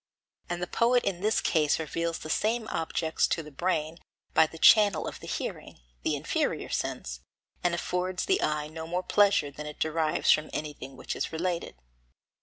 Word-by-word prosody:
And 175 0 -2
the - - +1
poet 240 +6 +2
in 185 -3 -2
this 215 +2 +2
case 155 -3 +2
reveals 165 +1 -2
the 155 - -8
same 220 +4 0
objects 160 0 0
to 165 - -1
the 150 - -11
brain 160 +1 -1 0.3
by 160 - +5
the 165 - -11
channel 205 -2 +6
of - - -6
the - - -10
hearing, - - -5 0.2
the - - 0
inferior - - -1
sense, - - -3 0.4
and 175 -1 +2
affords 180 +1 -2
the 380 - +2
eye 150 -1 0
no 160 +1 -7
more 180 +2 -2
pleasure 200 -8 +3
than 150 +2 -8
it 150 - -8
derives 160 +1 +2
from 155 0 +2
anything 145 -3 -6
which - - -5
is - - -2
related. 170 +1 -2
165 Hz, 180 wpm, -28 LUFS, 155-185 Hz, 0.4 s, channel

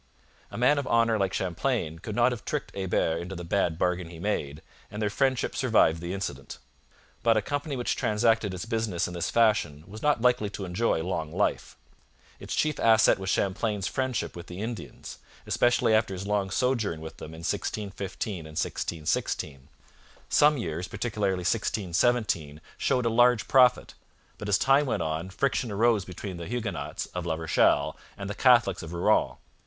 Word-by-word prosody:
A - - -8
man 135 +5 +4
of 140 - -4
honour 115 -1 +3
like 95 -1 +1
Champlain 90 - -2
could 105 +5 -6
not 120 +2 +4
have 120 -4 -5
tricked - - -4
Hebert 90 -3 0
into 90 +3 -6
the 85 - -6
bad 85 -1 0
bargain 90 -1 -1
he 85 - -10
made, 80 -6 -3 0.3
and 105 - -7
their 105 -2 0
friendship 130 +3 0
survived 110 -10 +3
the 85 +1 -4
incident. 70 -8 -5 0.6
But 115 -1 +3
a - - +2
company 145 +3 -3
which 120 -2 -1
transacted 110 -1 +1
its 95 +3 -5
business 110 -6 -1
in 90 - -7
this 85 -1 -2
fashion 105 -10 +2
was 105 +4 -10
not 150 -4 +2
likely 120 -3 +2
to 100 -1 -6
enjoy 90 -2 0
long 80 -4 -3
life. - - -1 0.6
Its - - -5
chief 155 -1 0
asset 110 -3 +5
was 95 0 -4
Champlain's 100 +1 0
friendship 130 -4 -2
with 85 0 -9
the 90 +1 -8
Indians, 115 +2 -7 0.3
especially 120 -2 +2
after 110 -3 +2
his 95 +2 -6
long 100 -1 0
sojourn 115 - 0
with 80 0 -9
them 80 - -9
in 80 - -10
1615 100 -1 -3
and 80 0 -10
1616. 75 -4 -2 0.6
Some 150 0 +5
years, 85 -4 -4
particularly 100 -6 -2
1617, 95 -5 0 0.2
showed 125 -1 +1
a - - +3
large 120 0 +4
profit, 130 -2 +4 0.5
but 105 - -5
as 100 - +4
time 135 +4 +3
went - - 0
on 80 +3 -3
friction 125 +2 -1
arose 110 -1 +2
between 90 0 -7
the 85 - -7
Huguenots 115 -2 -4
of 90 -1 -4
La 80 - 0
Rochelle 80 0 +2 0.2
and 100 - -5
the 100 - -3
Catholics 120 -6 +4
of 80 +1 -8
Rouen. 85 - +2
100 Hz, 175 wpm, -27 LUFS, 85-115 Hz, 0.6 s, asset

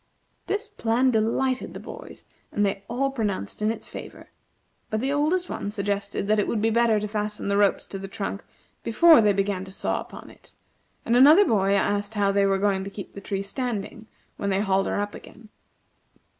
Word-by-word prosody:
This 415 +3 -1
plan 255 - +1
delighted 250 +4 0
the - - -6
boys, - - -10 0.3
and 205 - +1
they 195 0 -2
all 270 +4 -1
pronounced 210 - -3
in 210 - +2
its 225 - -4
favor; - - -10 0.6
but 215 - -1
the 270 +4 0
oldest 330 +5 +1
one - - -4
suggested 200 -1 -2
that 215 0 +3
it 205 - +1
would 225 - -1
be 225 +2 +1
better 230 -1 +3
to 210 - -3
fasten 210 0 -3
the 200 - +1
ropes 205 -1 +2
to 195 - -7
the 195 - -6
trunk 200 0 -5 0.4
before 315 +6 +6
they 210 -1 +4
began 195 -1 -1
to 190 - -10
saw - - -2
upon - - -11
it, - - -19 0.5
and 235 - +2
another 300 +11 +8
boy 200 - +2
asked 205 +2 0
how 200 -1 +2
they 200 0 +3
were 195 0 +2
going 195 -1 +1
to 195 - -6
keep 200 0 -9
the 200 - -10
tree 195 0 -3
standing 220 -1 -4 0.3
when 200 - -2
they 195 0 +1
hauled 195 -1 +1
her - - -1
up 205 0 -3
again. 220 -1 -13
210 Hz, 200 wpm, -25 LUFS, 200-235 Hz, 0.6 s, another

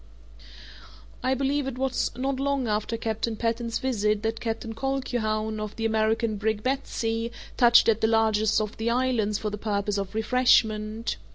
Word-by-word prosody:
I 260 +1 +1
believe 275 +1 0
it 260 -2 -4
was 265 -1 0
not 265 +1 -2
long 275 -2 0
after 215 +2 -1
Captain 225 0 -2
Patten's 230 +1 -1
visit 215 -4 0
that 225 0 -1
Captain 225 0 -4
Colquhoun, 220 -4 -2
of 215 0 -5
the 225 - -3
American 220 0 +1
brig 215 0 -1
Betsey, 230 -3 -1 0.2
touched 240 -2 +6
at 225 -1 +3
the 220 - +4
largest 220 -1 +3
of 215 0 -4
the 225 +1 -1
islands 235 -4 +1
for 210 0 -3
the 210 - -5
purpose 205 -1 -1
of 195 +1 -5
refreshment. 220 - +2
225 Hz, 160 wpm, -26 LUFS, 215-250 Hz, 0.2 s, touched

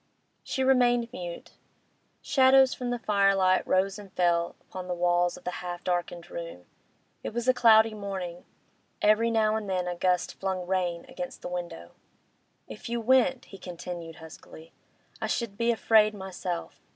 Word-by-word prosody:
She 265 - -2
remained 245 -2 +3
mute. 175 -7 -7 0.7
Shadows 265 -1 +5
from 250 -1 -4
the 245 - -1
firelight 195 -4 +3
rose 195 +2 +1
and 200 -2 -12
fell 170 -2 +1
upon 185 -1 -8
the 180 - -2
walls 175 0 +1
of - - -15
the 180 - -3
half 175 -1 -6
darkened 175 -1 -3
room. 165 - -7 0.6
It - - -6
was 240 +1 -2
a 255 - +6
cloudy 225 -2 +5
morning; 190 -4 -6 0.6
every 215 +2 +4
now 220 -1 +2
and 215 -2 -4
then 180 -1 -1
a 180 - -1
gust 180 0 0
flung 190 -2 -2
rain 175 -2 -1
against 180 - -7
the - - -4
window. 175 - -6 0.8
'If 110 - -9
you 235 0 -1
went,' 260 +2 +3
he 195 - -13
continued, 175 -2 -7
huskily, 160 0 -13 0.5
'I - - -1
should 230 -4 -2
be 235 +2 0
afraid 220 -2 +4
myself. 185 -3 -6
190 Hz, 160 wpm, -28 LUFS, 175-225 Hz, 0.8 s, a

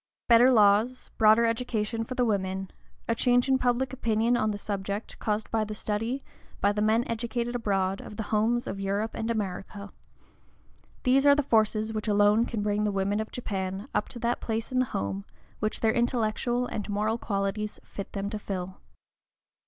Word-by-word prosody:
Better 240 +2 +7
laws, 220 +2 +3
broader 220 +1 +6
education 230 -1 -1
for 255 +3 -6
the 250 - +2
women, 190 -3 -1 0.4
a 230 - +2
change 245 +2 +3
in 265 -1 +3
public 250 +1 0
opinion 230 -1 +1
on 215 -2 +1
the 205 - -2
subject, 200 +1 -4
caused 210 0 -2
by 225 -1 +1
the 215 0 -5
study, 225 +6 -2 0.4
by 200 - +3
the 210 0 -2
men 220 +2 +3
educated 235 +1 -2
abroad, 195 -4 0
of 210 - -10
the 220 - -2
homes 230 +3 +2
of 195 - -5
Europe 200 +3 -1
and 225 - -3
America, 200 -1 -4 1.1
these 265 +2 +4
are 285 - +8
the 290 - +1
forces 220 -2 +2
which 215 0 -3
alone 205 +2 +4
can 220 -3 -3
bring 210 0 0
the 210 - +1
women 200 +1 0
of 220 - -4
Japan 195 -2 -4
up - - 0
to - - -7
that 235 +1 -1
place 225 +1 -3
in 255 - +1
the 255 - +3
home 100 - -3 0.4
which 215 +1 -2
their 220 -1 +3
intellectual 240 +1 0
and 215 -3 -5
moral 215 +3 0
qualities 205 +1 -2
fit 200 - -8
them 200 -1 -2
to 215 - -3
fill. 190 -2 -5
215 Hz, 185 wpm, -28 LUFS, 205-235 Hz, 1.1 s, are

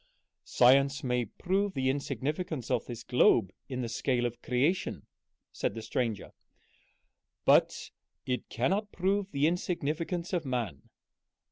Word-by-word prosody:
"Science 135 +2 +4
may 125 -2 0
prove 195 - -1
the 130 -1 0
insignificance 140 +1 -2
of 125 -3 +1
this 120 -1 -7
globe 120 -6 +4 0.2
in 130 -1 -3
the - - -2
scale 120 +1 0
of 120 0 -4
creation," 140 +9 0 0.5
said - - -2
the 115 - -5
stranger, 115 -5 -2 1.1
"but - - +3 0.3
it 125 -1 -3
cannot 195 - 0
prove 195 +2 0
the 140 -2 +1
insignificance 170 +1 -1
of 175 -3 0
man. 120 - -4
135 Hz, 125 wpm, -30 LUFS, 125-175 Hz, 1.1 s, Science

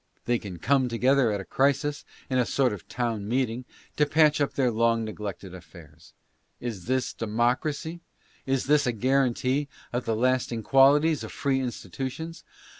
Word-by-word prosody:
They 120 -1 +1
can 95 -5 -8
come 130 - +2
together 125 +1 +3
at 100 -1 -2
a - - -10
crisis, 140 +1 0 0.2
in 130 -1 0
a 125 - +3
sort 130 -5 +1
of 100 - -9
town 115 -4 -2
meeting, 125 0 -1 0.3
to 150 - +3
patch 150 0 +4
up 145 - 0
their 130 -3 +2
long 115 0 +2
neglected 100 -3 -6
affairs. 85 -4 -14 0.5
Is 110 -7 -5
this 130 +1 -1
democracy? 125 +9 -1 0.5
Is 135 -1 0
this 145 -1 +3
a 120 - +1
guarantee 130 +3 +1 0.3
of 120 +1 -2
the 115 - 0
lasting 125 -1 0
qualities 145 +4 +4
of - - -7
free 135 -2 0
institutions 130 - -5
125 Hz, 160 wpm, -26 LUFS, 115-140 Hz, 0.5 s, patch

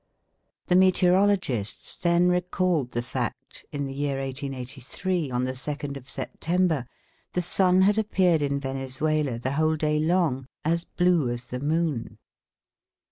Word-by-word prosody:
The 180 - +2
meteorologists 185 - +2
then 170 0 +3
recalled 180 -6 +1
the 120 - -1
fact, 125 +1 -5
in 145 -1 -2
the 135 - -5
year 140 -1 -1
1883, 135 +5 -3
on 125 0 -1
the 130 0 -1
second 145 +1 -4
of 135 -1 -9
September, 165 -7 -1 0.5
the 180 - +1
sun 185 +1 +3
had 205 +2 +4
appeared 185 -6 +2
in 140 -1 0
Venezuela 135 0 -1
the 125 +3 -2
whole 155 +2 +2
day 150 0 +1
long 155 -5 +1 0.2
as 170 +2 +1
blue 175 -7 +2
as 120 0 -5
the 125 - -4
moon. 150 -3 -1
150 Hz, 135 wpm, -26 LUFS, 130-180 Hz, 0.5 s, had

